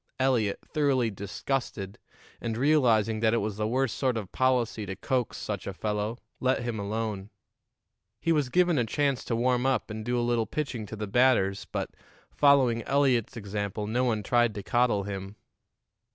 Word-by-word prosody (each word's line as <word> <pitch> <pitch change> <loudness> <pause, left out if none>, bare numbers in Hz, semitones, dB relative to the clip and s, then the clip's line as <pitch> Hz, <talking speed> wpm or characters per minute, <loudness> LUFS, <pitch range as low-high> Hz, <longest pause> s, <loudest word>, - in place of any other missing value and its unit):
Eliot, 120 -6 +2
thoroughly 135 -7 +1
disgusted, 100 0 -4 0.4
and 115 -2 -3
realizing 120 -6 +3
that 110 +1 +3
it - - +2
was 105 -2 -2
the 105 0 0
worst 130 0 0
sort 130 -4 0
of 100 -5 -5
policy 125 -4 +1
to 95 - -4
coax 125 +4 -1
such 100 -3 -4
a 100 - -4
fellow, 105 +2 -2 0.2
let 130 -1 +1
him 120 -3 -3
alone. 105 -1 -3 0.9
He 165 - 0
was 150 -5 +2
given 175 -1 +3
a 120 - +2
chance 140 +2 0
to 115 - -1
warm 125 +2 +2
up 130 -4 0
and 110 0 -5
do 120 +2 -1
a 120 - 0
little 120 -2 +1
pitching 130 -8 -3
to 110 - -7
the 105 0 -4
batters, 105 -3 +2
but, - - -3 0.4
following 135 -5 +4
Eliot's 135 -4 +2
example, 105 0 -3
no 120 +4 0
one 110 -4 0
tried 120 0 +2
to 100 - -5
coddle 120 -4 +2
him. 100 0 -6
115 Hz, 175 wpm, -28 LUFS, 105-130 Hz, 0.9 s, following